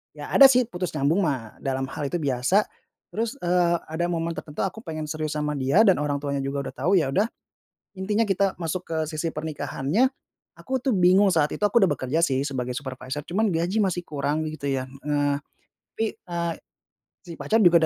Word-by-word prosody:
ya - - -8
ada 275 - +9
sih 255 -1 +4
putus 180 -5 -4
nyambung 150 +6 +2
mah 130 - -2
dalam 135 -1 -2
hal 145 - -3
itu 175 - -3
biasa, 145 +6 +2 0.5
terus, 230 +4 -2
eee, 175 -1 +3 0.2
ada 170 +2 0
momen 170 -1 -1
tertentu 150 -1 -5
aku 195 +3 -3
pengen 155 -7 -5
serius 155 0 -3
sama 150 0 -1
dia 140 +9 +3
dan 190 -8 +4
orang 145 -1 0
tuanya 140 -1 -1
juga 140 +1 -2
udah - - -6
tahu 170 +8 +1
ya 145 -7 +2
udah, 205 +9 +2 0.7
intinya 205 +4 0
kita 195 -2 +2
masuk 175 +2 -2
ke 160 - -3
sisi 160 +1 -3
pernikahannya, 155 - 0 0.5
aku 265 0 -3
tuh 255 -1 0
bingung 185 +1 +5
saat 150 -2 +3
itu - - -6
aku 235 +3 +4
udah 190 - +5
bekerja 135 +6 0
sih 135 -4 +1
sebagai 125 -3 -3
supervisor 130 +1 -6
cuman 210 +4 +1
gaji 175 +6 0
masih 180 -3 -1
kurang 150 +1 -1
gitu 155 -2 -4
ya, 130 -1 -1
heeh, 145 +1 -1 0.5
tapi, 225 - 0
eee, 170 -1 -3 0.7
si 170 -2 -10
pacar 220 - -1
juga 170 -1 +7
160 Hz, 190 wpm, -25 LUFS, 140-185 Hz, 0.7 s, ada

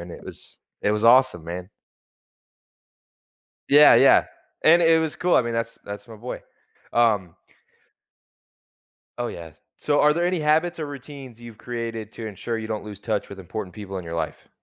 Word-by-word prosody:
and 85 0 -9
it - - -11
was - - -13 0.3
it 105 - +2
was 105 +1 -1
awesome, 120 -8 +5
man. 90 +2 -6 2.0
Yeah, 145 +1 +8
yeah, - - +6 0.4
and 170 +2 +6
it 165 0 +5
was 160 -2 -3
cool, 180 0 +1
I - - +4
mean, 120 - -3
that's 115 0 -3
that's 100 +1 -8
my 110 - -11
boy. 120 +4 -7 0.5
Um. 105 -7 +2 1.8
Oh, 120 - -1
yeah. 85 -2 -9 0.3
So 145 - +1
are 150 0 +5
there 170 +2 -1
any 180 0 0
habits 160 +3 +1
or 155 - -3
routines 135 -4 -10
you've 115 -2 -12
created 115 -2 -5
to 115 - -7
ensure 110 +3 -4
you 110 0 -6
don't 110 -1 -4
lose 105 -2 -9
touch 105 -2 -2
with 100 - -10
important 95 0 -7
people 100 -2 -7
in 90 - -8
your 80 - -6
life? 85 - -5
115 Hz, 175 wpm, -23 LUFS, 100-145 Hz, 2.0 s, Yeah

